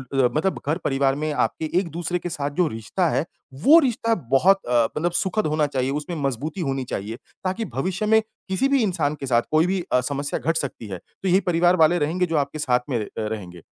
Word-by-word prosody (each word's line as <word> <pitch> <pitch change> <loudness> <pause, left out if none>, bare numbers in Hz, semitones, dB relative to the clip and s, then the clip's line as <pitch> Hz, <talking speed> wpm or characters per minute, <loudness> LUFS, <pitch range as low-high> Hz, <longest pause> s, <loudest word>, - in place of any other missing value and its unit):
ल 130 -2 +4
मतलब 175 +5 0
घर-परिवार 140 -4 +1
में 155 +1 -2
आपके 160 - -1
एक-दूसरे 175 -1 -3
के 175 - -5
साथ 145 -3 -2
जो 180 -2 +3
रिश्ता 115 - -1
है, 150 - 0 0.4
वो 315 - +8
रिश्ता 230 -5 +1 0.2
बहुत 190 +9 +5
अ, 120 -1 +4
मतलब 170 +3 0
सुखद 190 +2 0
होना 155 -1 +1
चाहिए, 135 -2 -1
उसमें 150 +4 -3
मज़बूती 140 - -2
होनी 135 -3 -1
चाहिए, 110 -1 -4 0.3
ताकि 190 +5 -1
भविष्य 185 +9 -1
में 220 +1 +5 0.3
किसी 190 +8 +1
भी 275 -2 +3
इंसान 160 -7 0
के - - -3
साथ 120 -2 +3
कोई 155 +2 +4
भी 190 0 0
अ, 125 - +4
समस्या 140 +2 -2
घट 165 +2 0
सकती 130 -7 -4
है, 95 - -5
तो 190 - -9
यही 185 +2 +5
परिवार 175 +1 +4
वाले 165 +1 +4
रहेंगे 170 +5 +1
जो 165 -3 -1
आपके 145 +2 -1
साथ 125 -4 +2
में 125 - 0
अ, - - -12
रहेंगे, 105 -6 -5
155 Hz, 215 wpm, -23 LUFS, 135-180 Hz, 0.4 s, वो